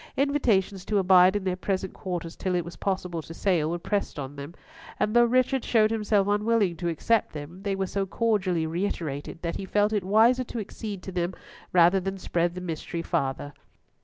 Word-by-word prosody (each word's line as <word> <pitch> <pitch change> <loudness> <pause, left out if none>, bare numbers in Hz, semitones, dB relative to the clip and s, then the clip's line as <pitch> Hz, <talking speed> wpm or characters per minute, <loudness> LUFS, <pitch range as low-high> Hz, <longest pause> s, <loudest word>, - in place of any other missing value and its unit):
Invitations 225 -10 +1
to 210 - 0
abide 185 0 +6
in 205 - -1
their 185 -1 0
present 190 0 -2
quarters 175 -3 -5
till 185 -2 -2
it 175 -2 0
was 170 - -8
possible 180 -4 -2
to 165 +1 -10
sail 170 -6 +1
were 170 - -1
pressed 200 +2 -2
on 140 0 -6
them; 145 +4 -8 0.4
and 215 - 0
though 240 0 +7
Richard 255 +2 +2
showed 220 -2 +3
himself 210 -3 +1
unwilling 205 -3 +2
to 175 0 -2
accept 215 +7 +1
them, 155 +5 -8
they 200 -1 -1
were 195 0 -1
so 195 +1 -2
cordially 190 -6 0
reiterated, 160 -4 -3
that 170 0 -2
he 195 - -5
felt 210 +2 +1
it 205 -3 0
wiser 225 +6 +4
to 240 - -8
accede 205 -2 -6
to 190 - -6
them 175 0 -2 0.4
rather 175 +2 +5
than 195 +1 -4
spread 175 -1 -1
the 180 - -5
mystery 170 0 -4
farther. 145 -3 -2
190 Hz, 195 wpm, -26 LUFS, 170-210 Hz, 0.4 s, though